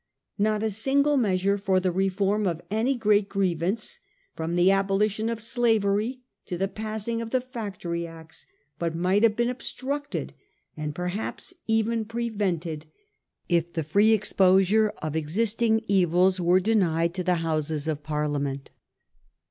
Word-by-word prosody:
Not 215 +1 +1
a 220 - 0
single 280 +7 +2
measure 200 -4 +1
for 190 -2 +2
the 185 0 0
reform 195 +2 +1
of 170 -2 -1
any 230 +6 +1
great 210 -3 +2
griev 185 -5 0
ance, 230 - -2 0.4
from 165 +1 -3
the 175 +2 +5
abolition 195 +3 +1
of 230 -1 -3
slavery 225 0 +1 0.3
to 175 - -3
the 195 +2 0
passing 220 +2 -3
of 230 - -5
the 255 - +2
Factory 200 -9 -5
Acts, 165 -1 -13 0.3
but 170 -1 -2
might 185 +4 +2
have 225 -2 +4
been 235 +1 +1
obstructed, 280 +3 -4 0.4
and 150 -1 -4
perhaps 180 - -4
even 225 0 +1
prevented, 195 -9 -3 0.6
if 170 -1 +1
the 160 - -1
free 200 +9 +3
exposure 200 0 +4
of 155 -1 -3
existing 220 +8 +1
evils 185 0 +3
were 175 +2 +4
denied 175 -5 +1
to 185 -1 -3
the 180 0 +2
Houses 155 -1 -1
of 150 -2 -2
Par 150 0 -2
liament. 140 -2 -3
195 Hz, 150 wpm, -26 LUFS, 170-220 Hz, 0.6 s, the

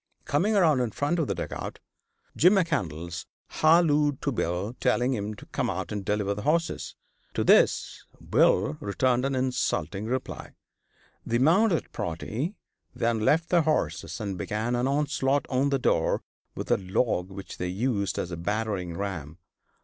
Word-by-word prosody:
Coming 200 +10 +1
around 160 -9 +4
in 125 -2 0
front 145 +10 -1
of 155 - 0
the - - -1
dugout, - - -5 0.6
Jim 180 +6 +6
McCandlas 90 - -1 0.3
hallooed 150 -3 +4
to 140 - +1
Bill, 100 +1 -2
telling 125 0 +2
him 105 -2 -3
to - - -13
come - - -2
out - - -3
and 105 -2 -3
deliver 105 0 0
the 105 - -6
horses. 165 +8 -1 0.4
To - - +1
this - - +3 0.2
Bill 75 - +2
returned 125 +5 +1
an 135 0 0
insulting 125 -5 -1
reply. 130 +2 -4 0.7
The 120 - 0
mounted 170 - +3
party 110 - -3 0.4
then 115 -1 +1
left 155 +10 +2
their 175 -2 +4
horses 155 -4 -1
and 100 -4 -4
began 110 +6 -1
an 120 +2 +1
onslaught 140 -1 +1
on 135 +2 +2
the 140 - +2
door 125 - +1 0.3
with - - -4
a - - +5
log 95 -1 0
which 95 0 -9
they 90 - -1
used 100 +1 -1
as 90 - -3
a 85 - -4
battering 100 -2 -2
ram. 85 -6 -5
120 Hz, 155 wpm, -27 LUFS, 100-145 Hz, 0.7 s, Jim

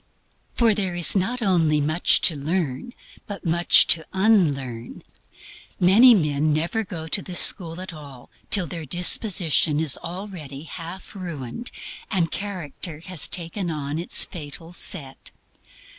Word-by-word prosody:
For 230 -2 +3
there 190 -4 -2
is 175 0 +3
not 230 +6 -1
only 165 -6 +1
much 155 +4 +1
to 165 - +5
learn, 155 - -4 0.3
but 205 -2 -9
MUCH 170 +1 +4
TO 160 - +5
UNLEARN. 145 - -1 0.8
Many 225 +7 +6
men 150 -4 0
never 170 +9 -2
go 165 -5 -8
to 195 +5 0
this 180 -2 +3
school 170 -2 +5
at 185 -1 -8
all 140 -5 -13 0.2
till 200 -4 +6
their 165 -1 -8
disposition 175 - +2
is 155 -5 +1
already 170 -6 -9
half 170 +3 -10
ruined 175 - -7 0.4
and 170 -5 -1
character 175 -5 -6
has 180 -1 +2
taken 175 +2 -4
on 150 -1 -5
its 170 - +2
fatal 165 +1 -10
set. 140 -7 -5
170 Hz, 135 wpm, -22 LUFS, 150-190 Hz, 0.8 s, Many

